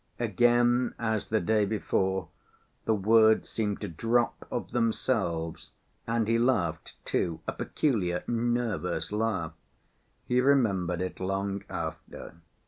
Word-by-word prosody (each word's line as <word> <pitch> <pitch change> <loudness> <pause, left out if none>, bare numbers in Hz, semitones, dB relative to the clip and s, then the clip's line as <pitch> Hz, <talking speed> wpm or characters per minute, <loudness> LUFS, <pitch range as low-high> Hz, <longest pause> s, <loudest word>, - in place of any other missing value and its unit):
Again, 120 +2 +3
as 110 -2 -1
the 110 - +1
day 105 +3 +2
before, 95 -3 -1 0.6
the 110 - +2
words 110 +2 +4
seemed 105 -3 -2
to 105 - -3
drop 115 +7 0
of - - -4
themselves, 95 -9 -1 0.3
and 115 -1 0
he 115 +1 +2
laughed, 115 -10 0
too, 85 -2 -1
a - - 0
peculiar, 95 - -1
nervous 115 -9 -1
laugh. 105 -7 -1 0.7
He 125 +1 +2
remembered 100 -10 +2
it 95 - -5
long 95 +1 -2
after. - - -6
110 Hz, 120 wpm, -28 LUFS, 95-120 Hz, 0.7 s, words